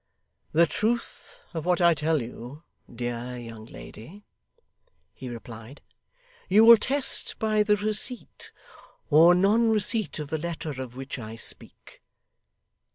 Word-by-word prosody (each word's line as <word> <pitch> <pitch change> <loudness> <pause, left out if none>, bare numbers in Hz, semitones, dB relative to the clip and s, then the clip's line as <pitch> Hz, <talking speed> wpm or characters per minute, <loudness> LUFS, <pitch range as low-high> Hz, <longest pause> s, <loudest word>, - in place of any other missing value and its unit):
'The 170 +2 +5
truth 235 - -3
of 160 -2 -4
what 180 +1 +1
I 170 -1 +5
tell 155 -2 0
you, 125 +6 -10 0.3
dear 120 +1 -5
young 115 -2 -10
lady,' 160 - -12 0.9
he 130 - -9
replied, 115 +2 -10 0.7
'you 215 +4 +6
will 230 0 +10
test 270 +3 0
by 215 -1 +1
the 210 0 +3
receipt 215 +4 -4 0.6
or 165 +4 +7
non 210 +5 +3
receipt 220 -1 0
of 150 -2 -6
the 160 - -1
letter 155 -4 -5
of 125 -2 -8
which 135 0 -7
I 110 -1 -8
speak. 115 - -5
160 Hz, 130 wpm, -26 LUFS, -, 0.9 s, will